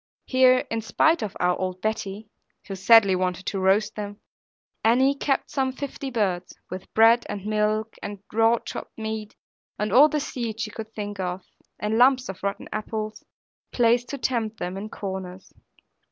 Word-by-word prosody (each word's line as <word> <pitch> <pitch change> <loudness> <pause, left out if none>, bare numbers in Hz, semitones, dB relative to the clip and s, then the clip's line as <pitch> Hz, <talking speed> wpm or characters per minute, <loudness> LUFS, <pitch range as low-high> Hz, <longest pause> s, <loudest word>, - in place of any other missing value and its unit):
Here, 255 -1 +4
in 225 0 -1
spite 320 +9 +2
of 205 - -4
our 180 0 +2
old 185 -1 -3
Betty 215 0 -3 0.4
(who 195 - -5
sadly 195 0 +6
wanted 185 0 -2
to 195 - -2
roast 195 +3 +2
them), 205 0 -6 0.6
Annie 260 +5 +4
kept 275 -1 -1
some 265 -2 0
fifty 275 +1 -6
birds, 190 -7 -2
with 185 +1 -7
bread 230 +2 +6
and 205 -1 -5
milk, 215 +1 0
and 205 0 -5 0.2
raw 225 +1 +4
chopped - - -8
meat, 220 -1 -5 0.4
and 210 +1 -2
all 295 +4 +8
the 300 - 0
seed 235 -5 -4
she 215 -1 -3
could 220 0 -8
think 205 -1 -5
of, 180 0 -3 0.4
and 215 +2 0
lumps 255 -1 +4
of 190 - -7
rotten 200 0 -3
apples, 215 0 -4 0.5
placed 240 0 +2
to 280 - -4
tempt 230 -4 -1
them, 180 -1 -4
in 195 +2 -5
the - - -8
corners. 190 -2 -7
215 Hz, 170 wpm, -25 LUFS, 195-235 Hz, 0.6 s, all